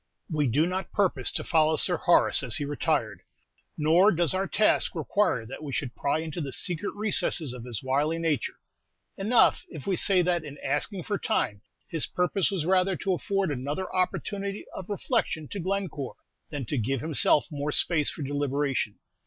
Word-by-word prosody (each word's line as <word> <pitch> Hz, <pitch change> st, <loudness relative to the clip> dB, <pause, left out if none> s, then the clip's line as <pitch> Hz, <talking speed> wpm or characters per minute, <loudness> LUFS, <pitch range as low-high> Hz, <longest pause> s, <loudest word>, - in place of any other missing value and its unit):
We 150 Hz, -3 st, +1 dB
do 145 Hz, +7 st, +2 dB
not 185 Hz, +1 st, -3 dB
purpose 180 Hz, -, +1 dB
to -, -, -1 dB
follow 160 Hz, -1 st, +3 dB
Sir 175 Hz, +3 st, +1 dB
Horace 175 Hz, -, +4 dB
as 125 Hz, -5 st, -2 dB
he 145 Hz, -, -1 dB
retired, 145 Hz, 0 st, -1 dB, 0.6 s
nor 165 Hz, +7 st, +5 dB
does 175 Hz, -2 st, +2 dB
our 190 Hz, +1 st, 0 dB
task 215 Hz, -2 st, +2 dB
require 165 Hz, -, 0 dB
that 130 Hz, +6 st, -8 dB
we 145 Hz, -, -5 dB
should 130 Hz, -2 st, -3 dB
pry 140 Hz, +2 st, 0 dB
into 165 Hz, +1 st, -5 dB
the 140 Hz, -3 st, -4 dB
secret 175 Hz, +7 st, -1 dB
recesses 180 Hz, -, 0 dB
of 125 Hz, -2 st, -8 dB
his 120 Hz, -2 st, -4 dB
wily 145 Hz, +5 st, +1 dB
nature; 160 Hz, -6 st, -1 dB, 0.6 s
enough 220 Hz, +5 st, +3 dB
if 155 Hz, -6 st, -9 dB
we 195 Hz, -, +1 dB
say 185 Hz, 0 st, +3 dB
that 175 Hz, -2 st, +1 dB
in 145 Hz, -1 st, -9 dB
asking 155 Hz, +7 st, -1 dB
for 205 Hz, +3 st, -2 dB
time, 100 Hz, -, -1 dB, 0.3 s
his 165 Hz, -3 st, +1 dB
purpose 180 Hz, +2 st, +1 dB
was 185 Hz, -6 st, -2 dB
rather 185 Hz, +1 st, +3 dB
to 190 Hz, 0 st, -1 dB
afford 195 Hz, -1 st, -1 dB
another 145 Hz, +7 st, -4 dB
opportunity 195 Hz, +2 st, -2 dB
of 190 Hz, -, -8 dB
reflection 205 Hz, -, -1 dB
to 200 Hz, -, -5 dB
Glencore 180 Hz, -7 st, -3 dB, 0.3 s
than 145 Hz, -4 st, -4 dB
to 140 Hz, +3 st, -2 dB
give 125 Hz, +3 st, -1 dB
himself 155 Hz, -1 st, +3 dB
more 145 Hz, 0 st, -2 dB
space 150 Hz, -1 st, +3 dB
for 155 Hz, -, -6 dB
deliberation. 140 Hz, -5 st, -1 dB
160 Hz, 175 wpm, -27 LUFS, 145-190 Hz, 0.6 s, nor